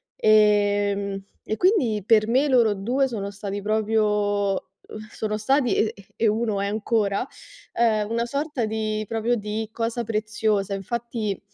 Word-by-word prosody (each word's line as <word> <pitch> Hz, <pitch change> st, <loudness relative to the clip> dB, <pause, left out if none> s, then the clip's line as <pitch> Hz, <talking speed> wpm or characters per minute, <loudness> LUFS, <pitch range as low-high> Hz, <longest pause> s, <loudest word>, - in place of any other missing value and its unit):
ehm, 205 Hz, -2 st, +2 dB, 0.2 s
e 215 Hz, -, -2 dB
quindi 295 Hz, -, +2 dB
per 215 Hz, -1 st, +4 dB
me 265 Hz, +5 st, +3 dB
loro 235 Hz, -6 st, +4 dB
2 245 Hz, +8 st, 0 dB
sono 200 Hz, -4 st, -4 dB
stati 200 Hz, 0 st, -5 dB
proprio 210 Hz, -1 st, +1 dB, 0.4 s
uhm, 215 Hz, 0 st, -9 dB
sono 215 Hz, -1 st, -3 dB
stati 250 Hz, +1 st, +2 dB
e 220 Hz, -, +1 dB, 0.2 s
e 230 Hz, -, +1 dB
1 215 Hz, -1 st, 0 dB
è 200 Hz, -, -1 dB
ancora, 210 Hz, 0 st, 0 dB, 0.5 s
ehm, 215 Hz, -3 st, +1 dB
una 235 Hz, +1 st, 0 dB
sorta 280 Hz, -1 st, -2 dB
di 215 Hz, 0 st, -2 dB
proprio 225 Hz, +2 st, 0 dB
di 210 Hz, +1 st, -4 dB
cosa 230 Hz, +1 st, -2 dB
preziosa. 215 Hz, -2 st, -1 dB
Infatti 220 Hz, 0 st, -3 dB
215 Hz, 140 wpm, -24 LUFS, 205-230 Hz, 0.5 s, per